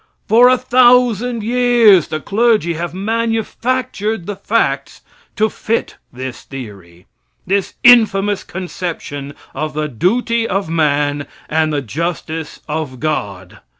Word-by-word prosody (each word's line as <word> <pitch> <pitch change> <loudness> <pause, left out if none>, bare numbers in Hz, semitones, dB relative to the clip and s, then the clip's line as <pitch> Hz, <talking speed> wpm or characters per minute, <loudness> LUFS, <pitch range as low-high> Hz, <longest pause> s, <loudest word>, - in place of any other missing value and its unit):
For 240 +3 +6
a 255 - +4
thousand 245 -2 +3
years 235 -6 +4
the 155 - -3
clergy 215 -3 +1
have 170 +2 -4
manufactured 225 +1 -2
the 205 - -4
facts 140 -11 -1 0.3
to 215 - +2
fit 225 +1 -3
this 130 0 -7
theory 100 -10 -11 0.4
this 195 0 -1
infamous 205 -5 +5
conception 170 -6 -6 0.2
of 155 -1 -4
the 155 0 -1
duty 225 - 0
of 195 -3 -2
man 145 -2 0 0.2
and 155 0 +1
the 145 -2 -1
justice 160 +3 -4
of 150 -4 -4
God. 100 - -4
185 Hz, 115 wpm, -17 LUFS, 150-230 Hz, 0.4 s, For